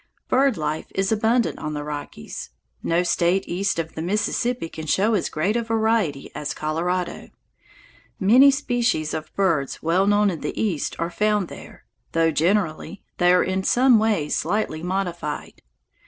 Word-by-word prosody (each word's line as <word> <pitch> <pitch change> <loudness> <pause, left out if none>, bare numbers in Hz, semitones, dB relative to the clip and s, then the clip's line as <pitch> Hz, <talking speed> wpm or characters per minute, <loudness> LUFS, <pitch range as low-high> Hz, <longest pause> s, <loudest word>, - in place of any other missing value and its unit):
Bird 265 -2 +3
life 155 0 -3
is 195 +1 0
abundant 225 +2 +1
on 150 0 -4
the 145 - -4
Rockies. 145 - -7 0.3
No 170 +2 +1
State 175 +2 +1
east 195 +2 -1
of 160 -1 -3
the 160 - -5
Mississippi 210 +4 -1
can 160 -1 -8
show 205 +8 +2
as 200 - 0
great 190 +8 -1
a 235 - +1
variety 220 -10 0
as 150 - -4
Colorado. 175 +4 -2 0.9
Many 245 +8 +7
species 245 - 0
of 155 0 -5
birds 165 -9 0
well 180 +4 +2
known 205 0 +3
in 165 - -6
the - - -4
East 185 -9 -1
are 170 +1 -2
found 210 -2 +1
there, - - -12 0.3
though, 165 0 +3
generally, 170 +2 0 0.2
they 175 0 +5
are 180 - +5
in 190 0 -1
some 250 +2 +5
way 210 -9 +1
slightly 165 0 -1
modified. 175 -4 -4
185 Hz, 155 wpm, -23 LUFS, 160-215 Hz, 0.9 s, Many